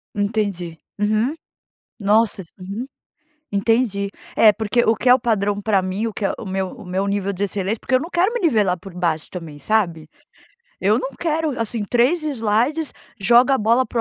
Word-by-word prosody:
Entendi, 200 Hz, -5 st, -2 dB, 0.2 s
uhum. 215 Hz, +8 st, +1 dB, 0.6 s
Nossa, 210 Hz, 0 st, +2 dB
s 165 Hz, -, -17 dB
uhum, 200 Hz, +7 st, -5 dB, 0.7 s
entendi. 200 Hz, -1 st, +1 dB, 0.3 s
É, 215 Hz, -2 st, +7 dB
porque 220 Hz, +2 st, +1 dB
o 225 Hz, -, +3 dB
que 250 Hz, -, 0 dB
é 250 Hz, -, +10 dB
o 255 Hz, -, +4 dB
padrão 205 Hz, -3 st, 0 dB
pra 205 Hz, -2 st, +2 dB
mim, 185 Hz, +4 st, -2 dB
o 220 Hz, -, -5 dB
que -, -, -5 dB
é -, -, +1 dB
o -, -, -8 dB
meu 190 Hz, 0 st, -2 dB
o -, -, -11 dB
meu 190 Hz, +2 st, -1 dB
nível 200 Hz, 0 st, -1 dB
de 190 Hz, -, -3 dB
excelência 200 Hz, +2 st, -2 dB
porque 260 Hz, -, 0 dB
eu 255 Hz, -, +4 dB
não 325 Hz, -, -6 dB
quero 360 Hz, +5 st, +2 dB
me 480 Hz, -, -2 dB
nivelar 210 Hz, -, +2 dB
por 195 Hz, +1 st, -11 dB
baixo 170 Hz, -3 st, -1 dB
também, 165 Hz, -5 st, -8 dB
sabe. 170 Hz, -4 st, 0 dB, 0.7 s
Eu 215 Hz, +5 st, +3 dB
não 260 Hz, -, -3 dB
quero, 315 Hz, -4 st, -1 dB
assim, 225 Hz, -1 st, -2 dB
3 250 Hz, -, +2 dB
slides, 270 Hz, +3 st, 0 dB, 0.3 s
joga 240 Hz, +6 st, +5 dB
a -, -, +1 dB
bola 235 Hz, +4 st, +3 dB
pra 235 Hz, -, -3 dB
215 Hz, 195 wpm, -21 LUFS, 195-240 Hz, 0.7 s, é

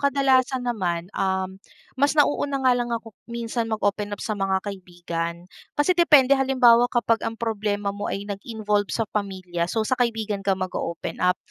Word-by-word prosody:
kadalasan 265 Hz, -2 st, +2 dB
naman, 180 Hz, -6 st, -2 dB
um, 190 Hz, 0 st, -2 dB, 0.4 s
mas 285 Hz, +3 st, +2 dB
nauuna 290 Hz, -1 st, +2 dB
nga 255 Hz, -, +6 dB
lang 245 Hz, -1 st, 0 dB
ako 230 Hz, -1 st, -4 dB, 0.2 s
minsan 235 Hz, 0 st, -3 dB
mag-open 205 Hz, -1 st, -1 dB
up -, -, -13 dB
sa 220 Hz, -, -1 dB
mga 195 Hz, -1 st, -1 dB
kaibigan. 175 Hz, -3 st, -5 dB, 0.3 s
Kasi 295 Hz, +5 st, +3 dB
depende, 295 Hz, -6 st, +5 dB
halimbawa 250 Hz, -3 st, +5 dB
kapag 235 Hz, -2 st, +1 dB
ang 225 Hz, 0 st, -3 dB
problema 205 Hz, -3 st, -2 dB
mo 205 Hz, 0 st, -4 dB
ay 200 Hz, -, -3 dB
nag-involve 205 Hz, 0 st, -2 dB
sa 225 Hz, -, -1 dB
pamilya, 185 Hz, -4 st, -3 dB
so 220 Hz, +2 st, 0 dB
sa 255 Hz, -, -3 dB
kaibigan 225 Hz, -4 st, -1 dB
ka 195 Hz, -1 st, +1 dB
mag-oopen 170 Hz, -2 st, -4 dB
up. 180 Hz, 0 st, +3 dB
215 Hz, 160 wpm, -24 LUFS, 190-245 Hz, 0.4 s, nga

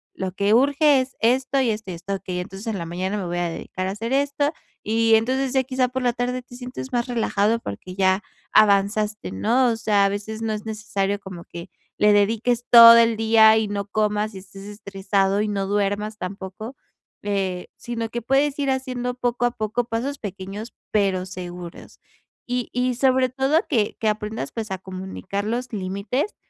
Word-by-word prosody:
lo 190 Hz, -1 st, -3 dB
que 200 Hz, +2 st, +1 dB
urge 280 Hz, +3 st, +4 dB
es 255 Hz, +1 st, -7 dB
esto, 260 Hz, +4 st, +2 dB
y 245 Hz, -, +1 dB
esto, 210 Hz, -3 st, -5 dB
y -, -, -5 dB
esto. 180 Hz, +4 st, -5 dB
Okey, 185 Hz, -2 st, -5 dB
entonces, 195 Hz, +5 st, -7 dB
en 220 Hz, -, -2 dB
la 170 Hz, -, -4 dB
mañana 185 Hz, +4 st, -3 dB
me 195 Hz, -, -3 dB
voy 175 Hz, 0 st, -3 dB
a 175 Hz, -1 st, 0 dB
dedicar 185 Hz, +2 st, -5 dB
a -, -, -2 dB
hacer 225 Hz, +4 st, -5 dB
esto. 285 Hz, +1 st, +1 dB, 0.3 s
Y 225 Hz, +1 st, +3 dB
entonces, 260 Hz, +4 st, +1 dB
ya 265 Hz, -, +3 dB
quizá 255 Hz, -1 st, 0 dB
por 260 Hz, +1 st, -4 dB
la 245 Hz, -, +3 dB
tarde, 250 Hz, +1 st, -2 dB
te 245 Hz, -, -14 dB
sientes 255 Hz, +1 st, -7 dB
más 240 Hz, +1 st, 0 dB
relajado 225 Hz, -2 st, +1 dB
porque 180 Hz, -, -8 dB
ya 190 Hz, 0 st, +2 dB, 0.3 s
avanzaste, 210 Hz, +1 st, +3 dB
¿no?, 245 Hz, +3 st, +2 dB
o 230 Hz, -, 0 dB
sea, 210 Hz, -3 st, +2 dB
a -, -, +3 dB
veces, 215 Hz, +2 st, -5 dB
no 220 Hz, -, -1 dB
es 210 Hz, 0 st, -6 dB
necesario 205 Hz, -2 st, -2 dB
como 185 Hz, -4 st, -10 dB
que 170 Hz, 0 st, -9 dB, 0.3 s
le 210 Hz, 0 st, +5 dB
dediques 230 Hz, +4 st, +1 dB
todo 230 Hz, -1 st, +11 dB
el 230 Hz, 0 st, +4 dB
día 220 Hz, 0 st, +6 dB
y 220 Hz, -1 st, 0 dB
no 200 Hz, 0 st, -3 dB
comas, 210 Hz, 0 st, -1 dB
y -, -, -6 dB
estés 195 Hz, +1 st, -12 dB
estresado, 200 Hz, -1 st, -1 dB
y 215 Hz, -, 0 dB
no 200 Hz, -1 st, -1 dB
duermas 205 Hz, +1 st, -1 dB
tampoco, 195 Hz, +6 st, -7 dB, 0.5 s
eh, 190 Hz, -3 st, -2 dB
sino 230 Hz, -1 st, -4 dB
que 240 Hz, 0 st, -4 dB
puedes 275 Hz, +4 st, +1 dB
ir 275 Hz, -1 st, 0 dB
haciendo 255 Hz, -2 st, -2 dB
poco 245 Hz, -1 st, -1 dB
a 245 Hz, -, +2 dB
poco 225 Hz, +1 st, -2 dB
pasos 250 Hz, +5 st, -3 dB
pequeños 200 Hz, +2 st, -7 dB, 0.2 s
pero 195 Hz, -3 st, +1 dB
seguros. 180 Hz, -1 st, -9 dB, 0.5 s
Y 245 Hz, -1 st, -2 dB
y 250 Hz, 0 st, 0 dB
sobre 260 Hz, 0 st, +3 dB
todo, 270 Hz, +5 st, +2 dB
que 225 Hz, -8 st, +1 dB
que 220 Hz, -, +1 dB
aprendas, 210 Hz, -7 st, -3 dB
pues, 220 Hz, -2 st, -5 dB
a 190 Hz, -, -2 dB
comunicar 190 Hz, +2 st, -5 dB
los 240 Hz, +3 st, -3 dB
límites 200 Hz, -, -2 dB
215 Hz, 195 wpm, -23 LUFS, 195-245 Hz, 0.5 s, todo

